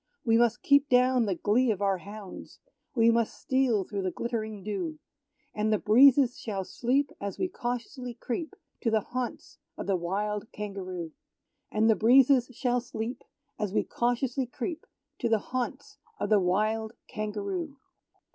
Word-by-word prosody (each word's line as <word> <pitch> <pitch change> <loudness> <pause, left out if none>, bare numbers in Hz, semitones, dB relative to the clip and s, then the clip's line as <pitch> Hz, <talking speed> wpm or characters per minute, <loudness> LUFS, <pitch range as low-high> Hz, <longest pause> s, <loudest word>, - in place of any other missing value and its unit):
We 225 -1 +4
must 235 0 +3
keep 280 0 +4
down 250 -2 +4
the 190 - 0
glee 230 +8 +2
of 210 -4 0
our 195 -2 +1
hounds; 200 0 -10 0.4
We 230 -1 +5
must 230 -1 0
steal 260 -6 +2
through 200 +1 -4
the 185 - 0
glittering 220 -1 -4
dew; 215 - -3 0.6
And 215 +1 0
the 215 - +4
breezes 255 +4 +5
shall 200 -4 -3
sleep 260 +8 0
as 200 -1 -4
we 370 - 0
cautiously 245 -4 -5
creep 320 - -4 0.3
To 230 - +1
the 220 -1 +2
haunts 250 +3 -5 0.2
of - - -5
the 195 - +1
wild 205 +4 -2
Kangaroo. 185 -5 -5 0.6
And 215 +1 +2
the 220 - +5
breezes 255 +2 +5
shall 245 0 0
sleep, 240 +1 -5 0.4
As 210 -3 -2
we - - +3
cautiously 245 +2 -1
creep 320 +7 -5 0.3
To 235 - 0
the 225 - +4
haunts 255 +5 -5 0.2
of - - -1
the 210 - +6
wild 215 +4 0
Kangaroo. 235 - -4
230 Hz, 155 wpm, -28 LUFS, 210-255 Hz, 0.6 s, the